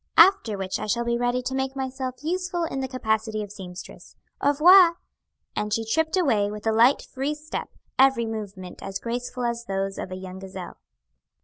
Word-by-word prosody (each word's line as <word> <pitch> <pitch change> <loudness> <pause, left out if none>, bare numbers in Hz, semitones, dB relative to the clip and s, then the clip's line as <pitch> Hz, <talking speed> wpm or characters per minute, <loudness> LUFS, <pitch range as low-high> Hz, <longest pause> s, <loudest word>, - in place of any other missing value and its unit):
"After 330 - +6
which 190 -1 -3
I - - -4
shall 235 +3 0
be 235 0 +1
ready 245 +1 0
to 260 - -3
make 265 0 -2
myself 260 0 -4
useful 360 +1 -1
in 320 -5 -3
the 265 - -2
capacity 220 -4 -1
of 205 - -9
seamstress. 185 -3 -10 0.3
Au 285 - +4
revoir." 340 +4 +7 0.6
And 210 0 -2
she 225 +2 0
tripped 320 - +1
away 220 - +2
with 210 +1 -7
a 220 - +3
light, 235 +5 +4
free 275 +3 -3
step, 305 +1 -6 0.3
every 265 -3 +5
movement 200 -5 -6
as 195 - -4
graceful 245 +3 -4
as 235 0 -2
those 195 -1 -2
of 185 - -5
a - - -4
young 185 0 -8
gazelle. 190 -1 -8
235 Hz, 190 wpm, -25 LUFS, 205-270 Hz, 0.6 s, revoir